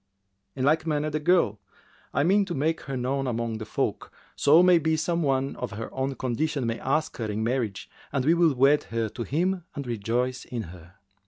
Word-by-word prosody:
In 130 -1 -1
like 155 +2 +2
manner 150 0 0
the 155 - -1
girl; 150 - +2 0.5
I - - +1
mean 195 +5 +4
to 175 - -4
make 160 +4 0
her 135 -1 -3
known 135 +2 -1
among 115 -2 -2
the 110 - -7
folk, - - -2 0.2
so 155 +5 +6
may 180 -2 +6
be 160 0 +1
some 170 +2 0
one 135 -2 0
of 125 -4 -5
her 110 +3 -6
own 135 +1 -2
condition 135 +3 -1
may 115 0 -2
ask 155 +4 -1
her 115 - -3
in 105 +1 -2
marriage 110 -5 -2 0.2
and 135 -3 -1
we 160 - +5
will 170 -4 +3
wed 140 +4 +4
her 115 -1 -2
to 120 - -8
him 175 +8 0
and 140 -2 -4
rejoice 120 +3 -1
in 120 -3 -5
her." 90 +1 -15
135 Hz, 210 wpm, -26 LUFS, 115-155 Hz, 0.5 s, so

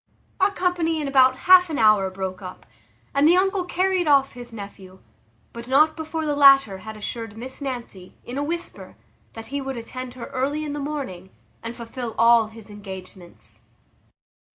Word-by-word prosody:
Our 385 +1 +4
company 355 -4 -1
in 295 - -3
about 260 -1 +4
half 365 -1 +7
an 305 - -3
hour 215 -3 +4
broke 190 0 -5
up, 185 -1 -10 0.5
and 280 +2 +4
the 345 - +6
uncle 385 0 +1
carried 370 -1 0
off 275 -2 +4
his 245 -1 -11
nephew; 200 -3 -10 0.6
but 235 0 -9
not 305 +4 +4
before 320 0 -4
the 295 -1 0
latter 275 -8 +6
had 220 +3 -9
assured 225 0 -6
Miss 260 +4 -9
Nancy, 240 -9 -7
in 245 - -8
a - - -1
whisper, 340 +3 -6 0.4
that 225 0 -9
he 280 - -1
would 270 -1 -5
attend 255 +2 -7
her 240 -2 -7
early 285 +4 -2
in 290 - -4
the 295 - -4
morning, 275 -11 -5 0.3
and 230 +1 -6
fulfil 235 0 -7
all 230 -1 +5
his 220 -1 -13
engagements. 190 -3 -11
255 Hz, 175 wpm, -23 LUFS, 220-300 Hz, 0.6 s, half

